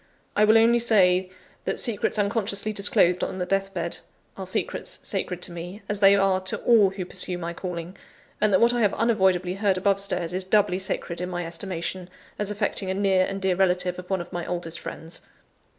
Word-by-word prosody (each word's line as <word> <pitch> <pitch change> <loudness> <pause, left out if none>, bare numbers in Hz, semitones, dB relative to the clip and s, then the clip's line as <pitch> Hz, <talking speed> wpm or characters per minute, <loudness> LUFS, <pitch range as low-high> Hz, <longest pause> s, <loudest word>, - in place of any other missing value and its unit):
I 210 - +4
will 220 +1 +6
only 230 +1 +4
say, 185 -5 +3 0.4
that - - 0
secrets 225 -2 +1
unconsciously 205 0 +1
disclosed 180 -3 +3
on - - -3
the 180 - -2
death 195 +1 -1
bed 170 -3 -4 0.4
are 190 -1 -6
secrets 185 - -2
sacred 180 -1 -2
to - - -1
me, 175 +4 -8
as 205 -1 -2
they 200 -1 +6
are 195 -1 +2
to 190 - -2
all 220 -5 +5
who 190 -1 -6
pursue 180 0 -2
my 170 -1 -5
calling; 175 0 -6 0.5
and 215 - +3
that 185 - +4
what 235 +1 +4
I 240 - 0
have 205 -2 +2
unavoidably 190 -6 +1
heard 195 -1 +1
above 195 +1 +1
stairs, 180 -3 -2
is 185 +1 -2
doubly 190 -1 +2
sacred 175 -2 -2
in 180 - -3
my 175 -1 -4
estimation, 175 +1 -4 0.3
as 210 -1 -1
affecting 205 -2 -1
a 190 - -1
near 190 -2 +2
and 195 0 -4
dear 190 -1 +1
relative 180 -1 +1
of 180 - -10
one 190 -2 0
of 175 - -11
my 175 0 -3
oldest 170 -2 -4
friends." 165 +1 -7
190 Hz, 205 wpm, -25 LUFS, 180-200 Hz, 0.5 s, will